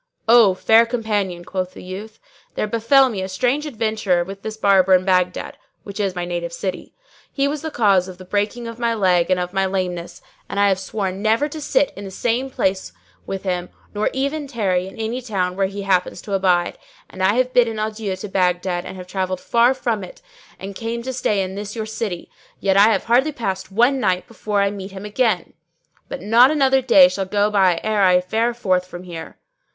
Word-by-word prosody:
"O 225 -5 +6
fair 225 +4 +4
company," 205 -7 -2
quoth 185 0 -4
the - - -10
youth, 205 +4 -8 0.4
"there - - 0
befell 230 +5 +4
me 215 -6 -4
a 190 - -4
strange 250 +10 0
adventure 215 -8 0
with 195 +2 -9
this 220 +1 -6
Barber 195 -3 +4
in 185 0 +1
Baghdad 180 -1 0 0.2
(which 200 0 -8
is 195 -3 -1
my 175 -1 -3
native 175 -1 -4
city); 185 +2 -5 0.4
he 275 0 0
was 290 0 -3
the 320 - -4
cause 200 -9 +2
of 185 -1 -9
the 185 - -12
breaking 205 +5 -2
of 230 0 -8
my 235 -1 0
leg 185 -4 +2
and 185 -1 +2
of 180 +1 -4
my 195 0 +1
lameness, 180 -2 -3 0.3
and 200 - -3
I 200 0 +4
have 190 -1 +1
sworn 190 0 -4
never 225 +7 +2
to 310 +1 -7
sit 290 0 +1
in 200 - -8
the 195 - -7
same 240 +6 -1
place 190 - -1 0.4
with 195 -1 -4
him, 180 -2 -2 0.2
nor 210 +1 0
even 280 +2 -2
tarry 190 -8 -1
in 190 - -12
any 225 +3 -3
town 190 -7 -2
where 195 0 +1
he 200 +1 -6
happens 185 -2 0
to 200 - -6
abide; 180 -2 +1 0.3
and 185 - -9
I 190 +3 +3
have 255 0 +1
bidden 235 -3 +3
adieu 215 -2 -3
to 190 +3 -7
Baghdad 180 -1 0
and 185 -1 -9
travelled 185 -1 -2
far 240 +5 +3
from 230 -6 -2
it 180 - -11 0.4
and 195 +1 -7
came 230 +3 -4
to 260 +1 -4
stay 210 -5 0
in 185 0 -5
this 205 +2 -6
your 220 -1 -3
city; 215 -5 -4 0.3
yet 195 -1 +1
I 200 +2 +7
have 225 - +1
hardly 260 +6 +2
passed 195 -6 -4
one 240 +7 +3
night 185 -5 0
before 210 -3 -1
I 200 - +1
meet 195 -1 -8
him 195 +1 -8
again. 210 -4 0 0.6
But - - -6
not 230 +5 +6
another 270 -3 +3
day 270 +2 +7
shall 200 -8 -3
go 205 +2 +1
by 190 -4 +3
ere 215 -1 +1
I 180 -2 +5
fare 225 +6 -1
forth 185 -5 0
from 175 0 -9
here." 170 -3 -9
200 Hz, 210 wpm, -21 LUFS, 185-230 Hz, 0.6 s, I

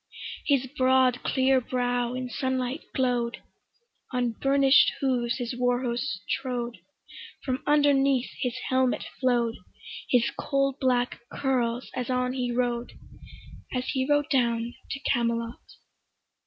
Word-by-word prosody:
His 275 -3 +3
broad 260 -2 +3
clear 265 0 +2
brow 245 0 -1
in 255 0 -3
sunlight 260 +3 -2
glow'd; 245 -2 0 0.7
On 250 -2 0
burnish'd 275 +3 +4
hooves 250 -3 0
his 245 -1 -3
war 245 0 +1
horse 235 -6 -2
trode; 245 -3 -3 0.7
From 260 0 -1
underneath 275 -3 +3
his 250 -1 -1
helmet 260 -1 +1
flow'd 240 -3 +1 0.5
His 245 -2 +3
coal 275 -1 0
black 250 -2 +1
curls 250 -3 -1
as 250 -1 -3
on 250 0 0
he 250 -2 -1
rode, 240 0 -1 0.8
As 250 0 -2
he 260 -2 0
rode 290 +1 +2
down 235 -3 +1 0.2
to 280 - -4
Camelot. 235 -3 0
250 Hz, 120 wpm, -27 LUFS, 240-265 Hz, 0.8 s, burnish'd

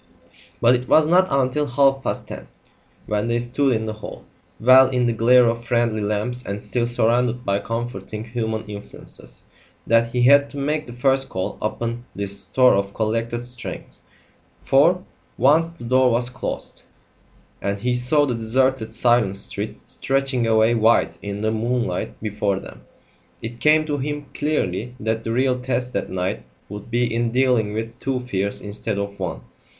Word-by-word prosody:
But 120 +1 +5
it 125 0 -1
was 155 - +6
not 180 +4 +4
until 135 +2 +1
half 135 +1 +3
past - - -3
ten, - - -8 0.6
when 105 +1 -1
they 120 0 +1
stood 125 +2 +1
in 110 0 -2
the 110 - -3
hall, 110 - -10 0.3
well 130 +2 +7
in 125 -2 +1
the 120 - +1
glare 120 +2 +5
of 115 0 -1
friendly 120 -2 0
lamps 105 +4 -2
and 100 -2 -4
still 120 +3 -2
surrounded 120 +1 +1
by 100 0 +1
comforting 110 -2 -5
human 110 -1 -3
influences, 105 -1 -9 0.4
that 115 0 +3
he 125 0 +1
had 140 +2 +6
to 145 - -10
make 150 +2 -1
the 120 - -8
first 135 +2 +1
call 95 0 -3
upon 115 +2 -3
this 100 0 -2
store 130 -1 +4
of 100 0 -1
collected 115 +2 -1
strength. 125 -1 -8 0.6
For, - - +4 0.3
once 155 +7 +4
the 170 -7 -14
door 130 +2 +3
was 120 +1 +1
closed, 130 - -5 0.8
and 100 0 -1
he 125 +4 -1
saw 125 +5 +3
the 130 - -1
deserted 115 +1 0
silent 120 -4 +2
street 100 - -4
stretching 135 -3 -1
away 110 +1 +4
white 115 0 +2
in 100 0 -5
the 110 0 0
moonlight 115 -4 -2
before 105 -2 -1
them, - - -13 0.5
it 120 +1 -7
came 155 +1 +4
to 145 -2 -2
him 145 +1 -4
clearly 125 -6 -2
that 110 +1 -2
the 115 - -3
real 125 +1 +1
test 125 0 -2
that - - -2
night 95 0 -2 0.3
would 105 +2 -8
be 120 0 0
in 115 0 0
dealing 125 -4 +2
with 115 +2 -5
two 130 -2 -2
fears 100 -5 -2
instead 105 0 -4
of 100 0 -4
one. 90 -3 -4
120 Hz, 170 wpm, -22 LUFS, 110-130 Hz, 0.8 s, well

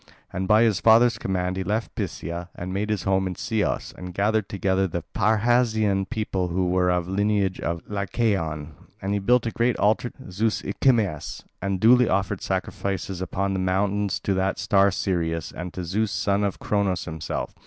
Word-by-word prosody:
And 95 0 -2
by 110 +2 +5
his 110 -5 +2
father's 115 +2 +5
command 95 -3 -1
he 95 - -1
left 105 +4 -2
Phthia 85 +2 -4
and 90 +1 -5
made 105 +2 -2
his 105 -3 -1
home 95 -1 +1
in 90 - -4
Ceos, 110 +1 -1
and 90 -1 -8
gathered 105 0 +1
together 95 -1 +1
the 85 -1 -4
Parrhasian 110 -2 +2
people 105 -6 -2
who 90 +1 0
are 90 -1 +3
of 90 -1 +1
the 90 - -7
lineage 100 -1 +1
of 85 0 -3
Lycaon, 95 -7 -1 0.3
and 100 +1 -2
he 100 - +1
built 120 +4 +3
a 115 - -1
great 120 +2 +1
altar 110 +4 +2
to 125 -7 -13
Zeus 105 +4 0
Icmaeus, 100 - 0 0.2
and 100 0 -1
duly 125 +3 +5
offered 95 -1 0
sacrifices 95 -1 -3
upon 95 +1 -1
the 95 - -1
mountains 100 +2 0
to 100 - 0
that 95 0 0
star 100 -1 +3
Sirius, 85 -4 -1
and 90 0 -6
to 90 - -4
Zeus 105 +5 0
son 100 -1 +1
of 100 -2 -1
Cronos 100 -3 0
himself. 80 -2 -4
95 Hz, 185 wpm, -24 LUFS, 90-105 Hz, 0.3 s, by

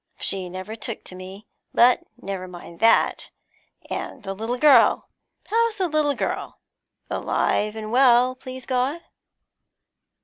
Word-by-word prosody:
She 190 -2 -3
never 185 +4 -7
took 230 0 -6
to 185 - -11
me, 190 +3 -10 0.3
but 245 +1 +5 0.2
never 190 -1 -5
mind 175 -1 -11
that. 225 +1 +3 0.6
And 255 - -5
the 195 -1 -4
little 225 +5 -3
girl? 295 +2 +5 0.4
How's 460 0 +1
the 375 -2 +1
little 300 -3 +1
girl? - - -3 0.5
Alive 210 +1 0
and 215 -1 -6
well, 250 0 +5
please 260 0 -9
God?' 265 +6 -1
235 Hz, 130 wpm, -23 LUFS, 195-265 Hz, 0.6 s, but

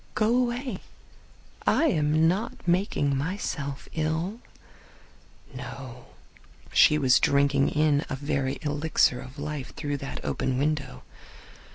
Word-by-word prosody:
"Go 220 +2 +2
away. 250 +1 -1 0.9
I - - +4
am 155 - +3
not 190 +2 -2
making 170 -6 +1
myself 140 -3 -3
ill." 160 +7 -2 1.1
No; 125 -1 -8 0.7
she 150 - +6
was 130 -4 +4
drinking 140 0 +3
in 150 -1 +2
a 140 - -2
very 135 -1 -2
elixir 145 -4 +1
of 130 +3 -11
life 145 -2 -5
through 145 -2 -3
that 135 0 -7
open 130 -1 -1
window. 140 - -2
145 Hz, 110 wpm, -27 LUFS, 135-160 Hz, 1.1 s, she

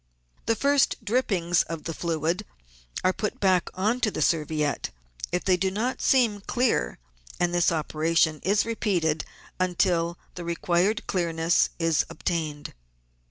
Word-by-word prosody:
The 225 - +3
first 280 +3 +3
drippings 195 -7 +2
of 165 -2 -5
the 165 - -4
fluid 165 +1 -1 0.6
are 185 - +3
put 210 - -3
back 185 -3 +2
on 215 +6 +1
to 245 - +2
the 155 - -1
serviette 150 -3 0 0.4
if 180 - -1
they 185 -1 +3
do 190 +1 +1
not 225 +7 -2
seem 230 -6 +3
clear, 235 - 0 0.4
and 175 0 +1
this 175 -1 +3
operation 160 0 +1
is 200 +2 +2
repeated 180 -9 0 0.3
until 175 -2 +1 0.2
the 175 - -7
required 175 +5 0
clearness 170 -2 +1
is 165 -2 +2
obtained. 155 -4 -3
175 Hz, 135 wpm, -26 LUFS, 165-205 Hz, 0.6 s, The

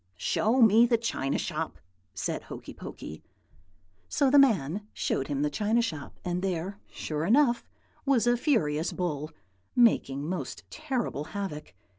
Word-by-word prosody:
"'Show 230 - +2
me 225 +2 +7
the 235 -1 +3
china 145 -12 -1
shop,' - - -3 0.4
said 90 - -2
Hokey - - -9
Pokey. 80 - -8 0.9
"So 275 -2 +2
the 285 - +7
man 205 - +3
showed 135 - -1
him 145 -1 -1
the 150 - +2
china 215 +8 +2
shop; 155 -11 -5
and 180 0 -1
there, 190 +1 -2
sure 155 -1 -4
enough, 240 - +4 0.4
was 270 -5 +3
a 240 0 +4
furious 165 - +1
bull, 155 -4 -2 0.5
making 145 - +3
most 170 -7 -4
terrible 255 - -2
havoc. 185 - -6
195 Hz, 140 wpm, -28 LUFS, 150-235 Hz, 0.9 s, me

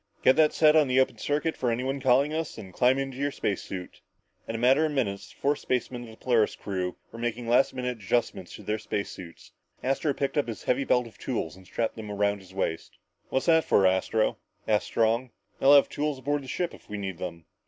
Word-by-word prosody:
Get 130 - +6
that 155 -1 +5
set 155 0 +5
on 155 -3 +5
the 130 0 +3
open 130 -4 +1
circuit 150 +5 -1
for 125 - -1
any 120 +2 -1
one 135 +1 -2
calling 135 +3 +3
us, 160 -1 -3
then 100 -4 -9
climb 125 +7 +3
into 135 -1 -3
your 140 +1 0
space 105 -8 -2
suit!" 90 -2 -8 0.5
In 115 - -4
a - - -1
matter 130 +6 +4
of 155 -1 0
minutes, 105 -6 -2
the - - -21
four 145 +1 +2
spacemen 125 -2 -2
of - - -12
the 110 - -13
Polaris 115 -4 +2
crew 90 -3 -4
were 115 - -9
making 120 0 -3
last 125 +3 +4
minute 125 -1 -3
adjustments 95 -3 -1
on - - -13
their 110 +1 -1
space 100 -1 -3
suits. 85 -2 -11 0.3
Astro 135 +2 0
picked 140 +2 0
up 145 - 0
his 115 - -6
heavy 135 +2 +1
belt 125 -1 +2
of 110 -3 -14
tools 90 - -3
and 95 -1 -16
strapped 115 0 -2
them 110 -1 -7
around 100 0 0
his 95 -1 -16
waist. 95 -4 -3 0.3
"What's 130 - 0
that 160 -1 +5
for, 95 - +4
Astro?" 95 +4 +1 0.3
asked 105 -1 +2
Strong. 115 +3 +1 0.3
"They'll 140 +2 +7
have 140 - +6
tools 150 -1 -2
aboard 145 +3 -1
the 135 - -11
ship 175 +6 -2
if - - -16
we 105 - -4
need 95 -3 -5
them." 85 -3 -6
120 Hz, 235 wpm, -27 LUFS, 105-135 Hz, 0.5 s, They'll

